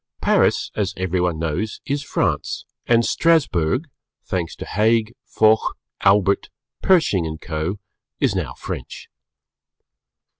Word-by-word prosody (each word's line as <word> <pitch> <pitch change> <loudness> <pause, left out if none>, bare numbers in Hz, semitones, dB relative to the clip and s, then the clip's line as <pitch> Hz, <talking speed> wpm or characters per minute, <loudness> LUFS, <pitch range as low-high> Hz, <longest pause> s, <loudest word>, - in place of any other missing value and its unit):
Paris, - - +2
as 100 -2 -1
everyone 90 -2 0
knows, 80 +7 -2
is 140 0 -1
France, 140 - -1 0.2
and 115 -1 +4
Strasburg, 130 - +2 0.4
thanks 85 -3 -3
to - - -7
Haig, 110 +2 +1
Foch, 110 0 +3 0.2
Albert, 100 0 +3 0.3
Pershing 155 - +3
and 80 0 -6
Co., 80 +4 -3 0.4
is 135 -8 +2
now 75 -10 -3
French. - - -7
100 Hz, 110 wpm, -21 LUFS, 85-115 Hz, 0.4 s, and